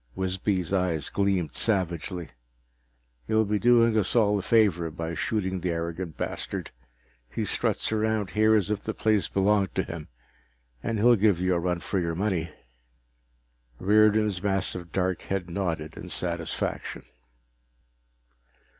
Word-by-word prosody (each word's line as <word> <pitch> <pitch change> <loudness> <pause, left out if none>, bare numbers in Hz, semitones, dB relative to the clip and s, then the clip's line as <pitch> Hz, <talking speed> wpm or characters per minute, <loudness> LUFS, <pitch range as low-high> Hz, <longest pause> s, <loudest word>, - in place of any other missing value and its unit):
Wisby's 95 -1 -1
eyes 90 -5 0
gleamed 100 -5 0
savagely. 90 -4 +1 1.0
"You'll 110 0 +3
be 105 0 0
doing 115 -1 +4
us 100 +4 0
all 105 -3 +3
a - - -3
favor 95 -7 +3
by 80 +1 -5
shooting 95 0 -1
the 90 +1 -2
arrogant 85 0 -4
bastard. - - -4 0.6
He - - -3
struts - - 0
around 110 -2 0
here 110 +1 +4
as 105 -2 +1
if 105 -1 -1
the 110 - -4
place 105 -4 +2
belonged 100 -2 +1
to - - +1
him. 85 -3 -7 0.7
And 115 - -2
he'll 120 +3 +5
give 105 -4 +3
you 90 0 +1
a 85 - +1
run 90 0 -1
for 95 - -1
your 85 -2 -2
money." 90 -3 -1 1.3
Riordan's 105 -1 +3
massive 95 -3 -1
dark 95 -2 -1
head 95 -3 -3
nodded 80 -5 -3
in 90 - -8
satisfaction. 85 -1 -3
95 Hz, 135 wpm, -27 LUFS, 85-105 Hz, 1.3 s, he'll